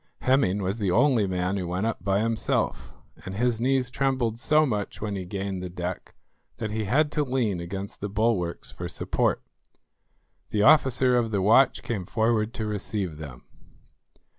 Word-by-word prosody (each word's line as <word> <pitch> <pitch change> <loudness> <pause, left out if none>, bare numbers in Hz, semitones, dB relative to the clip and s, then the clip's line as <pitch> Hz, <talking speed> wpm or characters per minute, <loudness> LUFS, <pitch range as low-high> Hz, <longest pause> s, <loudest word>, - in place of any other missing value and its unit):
Hemming 115 -7 +2
was 95 +5 -2
the 100 -3 0
only 115 +2 +3
man 90 +1 -1
who 90 -2 -3
went 90 +4 -2
up 115 -6 -3
by 100 +1 +1
himself, 110 - -1 0.3
and 95 +1 -6
his 115 +1 0
knees 130 0 +1
trembled 130 -4 0
so 155 +4 +4
much 105 -7 -3
when 105 -1 -3
he 95 -2 -4
gained 95 0 -4
the 90 - -5
deck 90 +1 -6 0.4
that 110 - -4
he 110 0 -2
had 145 +8 +2
to 150 - +1
lean 125 -9 -1
against 95 +3 -6
the 105 - -3
bulwarks 100 -4 -1
for - - -6
support. - - -1 1.1
The 105 -1 +1
officer 130 -3 +5
of 120 -2 +1
the 105 -2 0
watch 120 +6 +4
came 100 -7 -4
forward 110 -1 +1
to 110 - -3
receive 100 -5 -3
them. 70 -5 -9
105 Hz, 170 wpm, -26 LUFS, 95-125 Hz, 1.1 s, officer